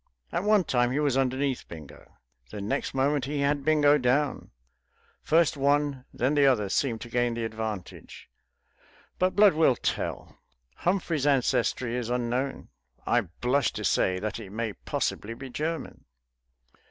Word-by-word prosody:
At 175 - -1
one 210 -2 +4
time 120 -5 +1
he 140 - 0
was 145 -3 +1
underneath 135 0 0
Bingo; 80 -4 -12 0.3
the 105 - -7
next 100 +6 -3
moment 135 0 +1
he 145 +1 -2
had 140 0 +1
Bingo 150 -1 +4
down; 135 +3 0 0.7
first 165 0 +3
one, 140 -1 +1
then 130 +4 0
the 145 -2 +4
other, 105 -7 +2
seemed 115 +1 0
to - - -7
gain 120 0 0
the 115 -1 -2
advantage. 110 -4 -6 0.9
But 185 0 +1
blood 205 -1 +6
will 155 -5 +4
tell. - - -4 0.4
Humphrey's 170 -5 0
ancestry 125 -3 +1
is 120 -2 -3
unknown; 125 +2 -2 0.4
I 120 - +3
blush 125 - 0
to 105 - -5
say 95 0 +2
that 105 +4 -4
it 105 -4 -9
may 110 0 -3
possibly 115 +3 -3
be 130 +1 -9
German. 160 +4 -4
130 Hz, 150 wpm, -27 LUFS, 115-145 Hz, 0.9 s, blood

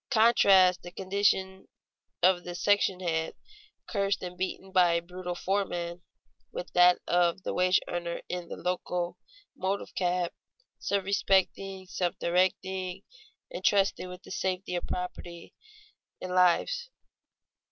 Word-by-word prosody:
Contrast 200 -6 +5
the 175 - -8
condition 190 0 0 0.6
of 180 -1 +4
the 175 0 -6
section 195 -1 +2
hand, 160 -2 -1 0.5
cursed 200 -2 -1
and 180 0 -6
beaten 190 +1 -4
by 180 -2 +4
a 170 - +2
brutal 180 +1 -6
foreman, 175 -2 -2 0.5
with - - -7
that 180 0 +6
of 175 +1 +2
the - - -3
wage 180 0 +3
earner 170 -1 -3
in 180 -1 -5
the - - -6
locomotive 180 - -4
cab, 180 -1 0 0.5
self 200 -1 0
respecting, 195 -1 +1
self 180 -1 -2
directing, 185 +1 0 0.5
and 185 - -6
trusted 195 -2 +2
with 180 0 -10
the - - -12
safety 185 0 -2
of 175 - -3
property 175 -1 -6 0.7
and 185 0 -5
lives. 185 - +2
185 Hz, 125 wpm, -29 LUFS, 175-195 Hz, 0.7 s, that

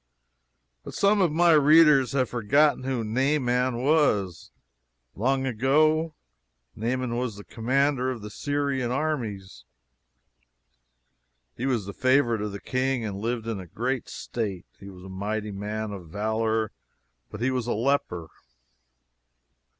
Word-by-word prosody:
But - - -9
some 200 +1 +3
of 175 -4 +3
my 170 +2 +4
readers 150 -3 +6
have 130 -2 +1
forgotten 130 +4 +2
who 130 -3 -1
Naaman 125 0 0
was, 130 - +1 0.6
long 135 +5 0
ago. 155 +6 +2 0.6
Naaman 120 +2 -2
was 125 -3 -2
the 100 - -10
commander 130 +3 0
of 120 -5 -5
the 105 - -7
Syrian 140 -1 -1
armies. 115 - -3 1.9
He 130 - -3
was 120 -7 0
the 100 - -7
favorite 130 -3 +2
of 105 0 -3
the 100 - -7
king 130 -1 -1
and 100 -2 -4
lived 115 +1 -2
in 110 -5 -4
great 130 +3 -2
state. 100 -7 -4
"He 100 - -10
was 90 -1 -12
a - - -10
mighty 105 +3 -4
man 105 +2 -4
of 90 -5 -9
valor, 110 +2 -1 0.6
but 105 - -8
he 125 +3 +1
was 125 -2 -2
a - - 0
leper." 110 - -1
120 Hz, 135 wpm, -26 LUFS, 105-135 Hz, 1.9 s, readers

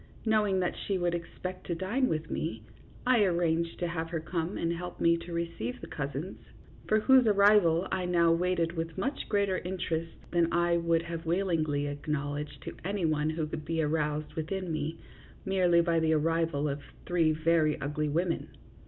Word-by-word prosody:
knowing 210 -3 +3
that 180 -1 0
she 195 - +1
would 175 -1 0
expect 180 +2 -6
to 170 - -1
dine 210 +10 0
with 155 0 -2
me, 115 -9 -3 0.4
I 250 -1 +4
arranged 170 -2 +1
to 175 - -1
have 165 -1 -3
her 165 -1 -2
come 165 +3 -3
and 170 0 0
help 175 +1 -6
me 170 0 +4
to 170 +1 -9
receive 170 -8 -3
the - - -8
cousins, 145 +5 -5 0.5
for 215 0 +3
whose 260 0 +6
arrival 200 -4 +5
I 185 -1 -1
now 170 -2 +3
waited 170 -1 +1
with 165 0 -4
much 260 +9 -3
greater 200 -3 +1
interest 170 -2 -3 0.2
than 170 -1 +2
I 175 0 +2
would 170 -1 +1
have 165 -1 -6
willingly 165 -5 +1
acknowledged 145 0 -4
to - - -7
any 195 0 -1
one 155 0 +1
could 155 -1 -3
be 165 0 -1
aroused 150 0 -1
within 175 +3 -3
me 155 +1 -2 0.5
merely 180 -3 +4
by 170 -1 +2
the 160 0 +2
arrival 160 -1 +1
of 140 0 -3 0.2
three 170 -3 +3
very 155 -1 +2
ugly 150 +2 -2
women. 170 +3 0
170 Hz, 175 wpm, -30 LUFS, 155-180 Hz, 0.5 s, whose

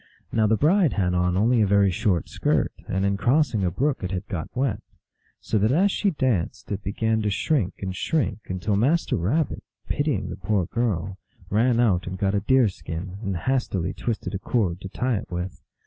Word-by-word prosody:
Now 110 -1 +3
the 110 +1 +3
bride 170 - +3
had 90 -3 +1
on 90 0 +1
only 115 +3 +3
a 105 - +3
very 100 -1 +4
short 90 -1 0
skirt, - - 0
and 95 +1 0
in 100 0 +1
crossing 120 0 +2
a 90 - +2
brook 135 - -1
it 90 - -2
had 90 -1 -4
got 90 -7 -4
wet. 135 +2 0 0.6
So 110 - -1
that 110 +4 +2
as 190 +8 +3
she 200 - +1
danced, 130 - -1
it 100 0 -2
began 110 +3 0
to 105 - 0
shrink 105 - 0
and 95 -1 -3
shrink, 155 - 0
until 95 +3 -1
Master 140 +12 +2
Rabbit, 130 - 0 0.2
pitying 145 -9 -1
the - - -6
poor 95 -1 0
girl, 95 -4 -2 0.3
ran 115 +3 +3
out 95 -8 +2
and 95 0 -4
got 95 +1 0
a 100 - +2
deer 125 +4 +4
skin, 90 +2 -6
and 100 -4 -2
hastily 100 -5 -1
twisted 115 -2 -3
a 95 - -2
cord 100 -6 0
to 95 - -6
tie 125 +2 0
it - - -7
with. 90 0 -5
100 Hz, 200 wpm, -24 LUFS, 95-125 Hz, 0.6 s, very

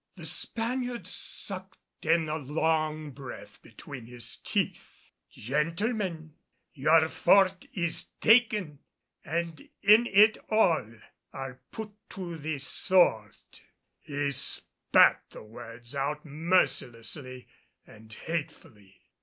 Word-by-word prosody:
The - - -9
Spaniard 245 +1 -2
sucked 190 -4 -4
in 165 0 +3
a 155 +1 -2
long 155 +1 -1
breath 120 -6 -10
between 120 +1 -11
his 120 -1 -2
teeth. - - -4 0.2
"Gentlemen, 165 - -2 0.4
your 155 +3 +4
fort 190 +2 +3
is 170 -3 -1
taken 215 - +3 0.4
and 165 -2 -4
in 215 +4 +6
it 215 +2 +5
all 170 - +2 0.4
are 135 -1 -7
put 220 -1 -7 0.2
to 180 -4 -6
the 155 -1 -4
sword." 135 - +2 0.6
He 145 -1 -3
spat 140 - +3
the - - -11
words 120 +2 -8
out 145 +2 -3
mercilessly 140 -5 0 0.4
and 110 0 -16
hatefully. 110 - -7
155 Hz, 100 wpm, -28 LUFS, 130-185 Hz, 0.6 s, in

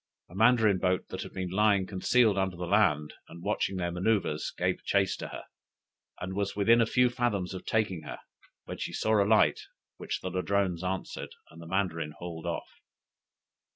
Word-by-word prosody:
A - - -12
Mandarin 110 -2 +4
boat 90 0 0
that - - -5
had - - -7
been 95 -1 -4
lying 100 -1 +3
concealed 105 +3 +2
under 95 -2 0
the 90 - -4
land, 80 -7 +2
and 85 +1 -12
watching 100 -1 -1
their 85 -1 -1
manoeuvres, 90 -4 0
gave 90 +1 -1
chace 100 -1 +1
to - - -6
her, - - -8 0.8
and 95 +1 -5
was 100 0 -2
within 115 +3 +4
a 115 - +3
few 125 +2 +4
fathoms 120 -7 -1
of 95 - -8
taking 105 -7 0
her, 75 - -7 0.5
when - - -7
she - - -4
saw 110 -1 +2
a 100 - -2
light, 110 -1 +4 0.4
which - - -4
the 95 - -4
Ladrones 95 -1 0
answered, 95 +1 -4 0.2
and 85 - -12
the 85 - -10
Mandarin 85 -5 -1
hauled 85 -2 -7
off. - - -5
95 Hz, 185 wpm, -29 LUFS, 90-105 Hz, 0.8 s, Mandarin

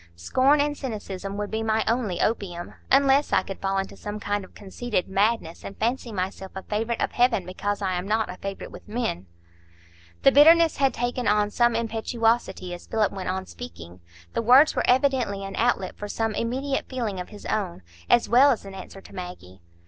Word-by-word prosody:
Scorn 260 - +3
and 290 0 +1
cynicism 200 -7 -5
would 205 0 -4
be 220 0 -1
my 220 0 +1
only 225 -6 0
opium; 180 -6 -2 0.2
unless 275 +1 +4
I - - +3
could 195 - -7
fall 195 0 0
into 195 0 -3
some 210 0 -6
kind 205 0 -2
of 185 - -15
conceited 205 0 -3
madness, 195 -3 0
and 195 - -8
fancy 235 +1 -1
myself 190 -1 -4
a 190 - -6
favourite 225 +2 -2
of - - 0
Heaven 240 -6 +2
because 205 +3 -3
I 190 -1 0
am 180 +1 -3
not 220 +1 +1
a 180 - -8
favourite 195 +1 -6
with - - -12
men." 215 - -3 1.0
The 275 - +7
bitterness 325 +3 +6
had 275 -1 +2
taken 245 0 -2
on 210 0 +2
some 240 0 +2
impetuosity 225 -4 0
as 175 - -10
Philip 215 -2 +1
went 190 -2 -5
on 190 0 -2
speaking; 85 +1 -10 0.3
the - - 0
words 255 +7 +6
were - - 0
evidently 250 -6 +2
an 195 - -6
outlet 230 -5 0
for 205 - -6
some 225 +1 -1
immediate 265 +5 -2
feeling 230 -7 -3
of 180 - -6
his 210 -1 -12
own, 185 - -2 0.3
as 240 - +4
well 255 +5 +6
as 235 -6 0
an 195 - -9
answer 195 0 -10
to - - -15
Maggie. 95 - -9
210 Hz, 195 wpm, -25 LUFS, 190-245 Hz, 1.0 s, The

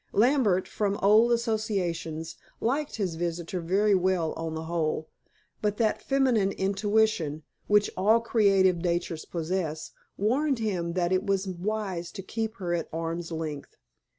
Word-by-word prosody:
Lambert, 220 -6 +3
from 200 -1 -1
old 215 +4 +6
associations, 195 -9 -1 0.2
liked 280 +5 -1
his 195 -6 -1
visitor 170 +1 -3
very 200 +5 +2
well 185 -3 +1
on 165 -1 -4
the 160 - -4
whole, 160 -1 -2 0.5
but 210 -1 0
that 220 -2 +1
feminine 255 -8 +2
intuition, 195 -6 +1 0.2
which 210 0 +4
all 215 +5 +4
creative 195 -6 +3
natures 170 -1 -2
possess, 165 -2 -3 0.3
warned 265 +7 +1
him 185 -7 -2
that 175 0 0
it 185 0 +2
was 195 0 +1
wise 185 -2 -3
to 195 - -7
keep 220 +2 -3
her 175 -3 -3
at 170 - -2
arm's 165 +1 -4
length. 155 -3 -5
190 Hz, 140 wpm, -27 LUFS, 170-215 Hz, 0.5 s, old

